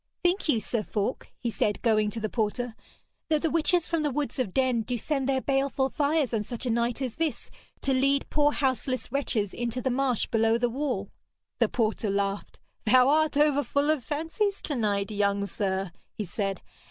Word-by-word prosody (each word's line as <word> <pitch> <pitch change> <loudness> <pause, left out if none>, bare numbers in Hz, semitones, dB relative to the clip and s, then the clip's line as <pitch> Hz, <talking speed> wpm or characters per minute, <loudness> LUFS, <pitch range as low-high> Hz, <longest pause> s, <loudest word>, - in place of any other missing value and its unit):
'Think 355 -1 +1
you, 235 - +4
Sir 220 +2 -2
Falk,' 210 +3 -3
he 235 - -2
said, 205 0 0
going 215 -3 +3
to 225 - -5
the 215 - -1
porter, 230 +2 -1 0.6
'that 310 -2 +2
the 325 - +1
witches 335 +1 +2
from 330 -2 0
the 300 - +1
woods 285 0 -2
of 240 -7 0
Denn 255 0 +2
do 245 +2 -2
send 275 +2 -1
their 265 -1 +2
baleful 270 0 +1
fires 290 -2 +1
on 220 - +1
such 240 +4 -6
a 245 - +1
night 235 +3 0
as 250 -3 -4
this 325 -2 -2 0.3
to 275 - +1
lead 275 +2 +2
poor 295 0 +3
houseless 260 -3 -1
wretches 230 -7 -1
into 240 +1 -2
the 260 +1 0
marsh 255 -2 +1
below 225 0 +2
the 240 0 +1
wall?' 250 -7 -2 0.5
The - - +3
porter 220 -2 0
laughed. 200 0 -2 0.3
'Thou'rt 280 +6 +5
over 295 -1 +4
full 285 +3 +1
of 300 -5 -1
fancies 325 - -1
to 295 - -2
night, 205 -3 0
young 200 -1 +1
sir,' 195 -2 -2 0.2
he 210 - -3
said. 195 +1 -3
250 Hz, 190 wpm, -27 LUFS, 215-285 Hz, 0.6 s, Thou'rt